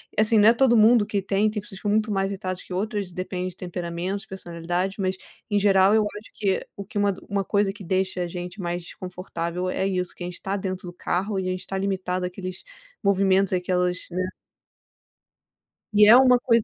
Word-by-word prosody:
e - - +3
assim, 220 +1 +3
não 210 +2 +7
é - - +6
todo 240 -1 +4
mundo 220 0 +6
que 205 - -1
tem. 200 +2 +1
Tem 210 -1 -3
pessoas 195 -1 -11
que - - -19
ficam 205 - -1
muito 215 0 +1
mais 195 -1 0
irritadas 185 -2 -4
que - - -17
outras, 200 -1 -2
depende 185 0 -3
de 180 - -15
temperamentos, 180 +2 -4
personalidade, 175 +1 -3
mas, 185 0 0 0.3
em 205 - +2
geral, 195 0 +5
eu 220 - +4
acho 220 - -12
que 195 -3 0
o 200 - -6
que 205 - -7
uma 200 -1 +2
uma 200 -1 0
coisa 200 -1 +1
que 205 - -11
deixa 185 +1 -1
a - - -3
gente 180 +2 -6
mais 175 0 -3
desconfortável 180 0 -5
é 190 +1 0
isso, 180 -2 -2
que 175 - -7
a - - -3
gente 180 0 -9
tá 195 +1 -2
dentro 185 -2 -4
do 175 - -7
carro 190 +3 -1
e 185 - -2
a - - 0
gente 185 0 -5
tá 195 - -3
limitado 185 -2 -1
àqueles 185 0 -6 0.4
movimentos 195 -1 +3
àquelas 180 0 +1
né. 185 +1 -1 1.7
E 210 0 +6
é 225 - +10
uma 250 -1 +6
coisa 230 -2 +3
190 Hz, 215 wpm, -25 LUFS, 180-205 Hz, 1.7 s, é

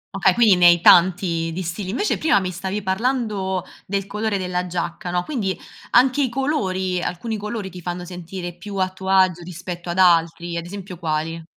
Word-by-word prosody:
Okay, - - +3
quindi 225 -5 +6
ne 175 -1 +6
hai 175 0 +6
tanti 175 -1 +4
di 185 +3 -4
stili. 180 +3 -4
Invece 255 - 0
prima 315 -9 +3
mi 185 -1 -3
stavi 190 +3 -4
parlando 200 -3 -1 0.2
del 195 0 -1
colore 210 +1 -2
della 180 -1 -2
giacca, 175 0 -4
no, 175 0 0
quindi 215 -11 -3 0.3
anche 260 +3 +4
i 260 - +1
colori 190 - -1
alcuni 220 +7 -3
colori 210 -2 -5
ti 180 -1 -9
fanno 175 +1 -5
sentire 175 0 -7
più 200 +3 -9
a 185 -1 +1
tuo 190 0 -7
agio 185 -2 +4
rispetto 175 0 -7
ad 175 - -3
altri, 170 -1 +3
ad 170 0 -4
esempio 195 -2 -8
quali? 165 0 -2
185 Hz, 185 wpm, -22 LUFS, 175-200 Hz, 0.3 s, quindi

